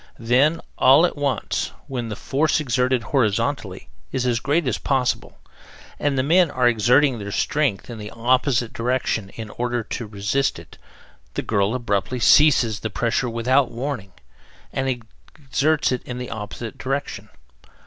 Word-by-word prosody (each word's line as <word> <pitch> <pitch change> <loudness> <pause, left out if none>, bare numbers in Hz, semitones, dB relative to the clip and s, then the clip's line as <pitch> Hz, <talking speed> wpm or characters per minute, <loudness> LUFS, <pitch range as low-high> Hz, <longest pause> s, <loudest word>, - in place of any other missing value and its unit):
Then, 135 +7 +2 0.2
all 140 +6 +7
at 175 - -2
once, 145 -2 -2
when 125 -5 -4
the 105 - -4
force 150 +8 +1
exerted 125 -3 +1
horizontally 115 -4 -1 0.2
is 130 -2 -1
as 120 -2 +1
great 145 +4 0
as 125 - -1
possible, 130 -3 -1 0.6
and 145 -2 0
the 130 - +2
men 170 +4 +4
are 125 -3 +2
exerting 120 +3 +3
their 100 0 -6
strength 135 -3 0
in 120 -2 -8
the 105 0 -7
opposite 125 +1 +1
direction 115 -4 -1
in 110 -2 -7
order 120 -1 -2
to 115 +1 -5
resist 105 +7 -1
it, - - -14 0.6
the - - -2
girl 105 +2 +1
abruptly 120 0 -1
ceases 120 -5 +5
the 110 - -3
pressure 120 +3 0
WITHOUT 125 +4 +2
WARNING 120 -6 -5 0.6
and 135 0 -1 0.5
exerts 150 +1 +1
it 125 - -1
in 125 - -7
the 125 0 -6
OPPOSITE 110 +1 -7
DIRECTION. 130 -6 -4
125 Hz, 150 wpm, -22 LUFS, 115-140 Hz, 0.6 s, all